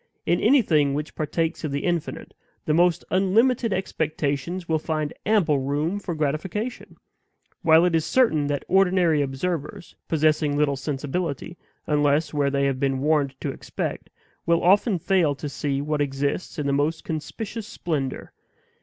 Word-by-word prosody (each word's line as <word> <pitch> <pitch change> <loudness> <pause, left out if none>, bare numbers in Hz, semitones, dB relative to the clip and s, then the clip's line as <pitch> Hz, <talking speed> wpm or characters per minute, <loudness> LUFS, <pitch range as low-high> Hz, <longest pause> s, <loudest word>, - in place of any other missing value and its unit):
In - - +2
anything 155 - +3
which 150 +1 -4
partakes 160 +2 -2
of 155 - -2
the 140 0 -2
infinite, 175 -3 -3 0.3
the 155 - +1
most 175 +1 +3
unlimited 225 +5 +2
expectations 160 -2 -2
will 160 -1 +1
find 155 -1 -2
ample 185 -10 +3
room 145 +8 -1
for 175 -4 -4
gratification; 160 - -3 0.7
while 160 +1 +5
it 180 - +1
is 165 -1 +2
certain 160 - +2
that 145 -1 -2
ordinary 180 -4 +3
observers, 165 +7 -4
possessing 155 -2 +2
little 145 -1 +2
sensibility, 145 +4 -3 0.3
unless 150 +1 +1
where 145 -2 +1
they 140 0 +1
have 135 -2 0
been 135 -1 +1
warned 145 -1 +1
to - - -2
expect, - - -5 0.4
will 170 0 +3
often 195 +3 +4
fail 170 -4 +2
to 145 - -6
see 140 -1 -2
what 150 0 -1
exists 140 +5 -2
in 150 - -2
the 140 - +1
most 150 +4 0
conspicuous 205 +8 -5
splendor. 150 -10 -3
155 Hz, 150 wpm, -24 LUFS, 145-180 Hz, 0.7 s, while